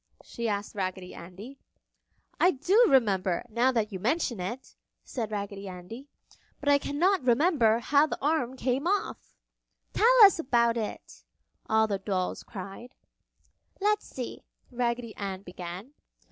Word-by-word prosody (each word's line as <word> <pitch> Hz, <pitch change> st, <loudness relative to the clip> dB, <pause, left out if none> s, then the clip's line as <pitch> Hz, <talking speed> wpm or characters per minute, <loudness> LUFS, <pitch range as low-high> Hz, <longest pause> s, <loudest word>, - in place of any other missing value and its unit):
she 235 Hz, -1 st, -4 dB
asked 205 Hz, 0 st, -3 dB
Raggedy 185 Hz, -2 st, -4 dB
Andy. 195 Hz, +11 st, -11 dB, 0.8 s
"I 360 Hz, -, +5 dB
do 375 Hz, -, +3 dB
remember, 195 Hz, -, +2 dB
now 235 Hz, +4 st, +2 dB
that 225 Hz, -3 st, -1 dB
you 190 Hz, -, -5 dB
mention 245 Hz, -, 0 dB
it," 220 Hz, +9 st, -6 dB, 0.3 s
said 230 Hz, -4 st, -4 dB
Raggedy 200 Hz, -1 st, -5 dB
Andy, 190 Hz, +9 st, -9 dB, 0.5 s
"but 285 Hz, -, -1 dB
I 285 Hz, 0 st, +5 dB
can 285 Hz, +1 st, -5 dB
not 370 Hz, +1 st, +3 dB
remember 250 Hz, -3 st, +3 dB
how 285 Hz, +5 st, +3 dB
the -, -, -4 dB
arm 265 Hz, -4 st, 0 dB
came 260 Hz, +5 st, -1 dB
off!" 405 Hz, +2 st, -2 dB, 0.6 s
"Tell 455 Hz, -, +4 dB
us 395 Hz, -4 st, +7 dB
about 235 Hz, -6 st, +2 dB
it!" 220 Hz, -3 st, -6 dB, 0.5 s
all 220 Hz, 0 st, +4 dB
the 200 Hz, -2 st, -2 dB
dolls 190 Hz, -2 st, -2 dB
cried. 200 Hz, +5 st, -9 dB, 0.8 s
"Let's 420 Hz, +1 st, +1 dB
see!" 250 Hz, -2 st, -7 dB, 0.3 s
Raggedy 235 Hz, -2 st, -2 dB
Ann 195 Hz, -1 st, -5 dB
began. 180 Hz, +5 st, -8 dB
235 Hz, 140 wpm, -28 LUFS, 200-280 Hz, 0.8 s, us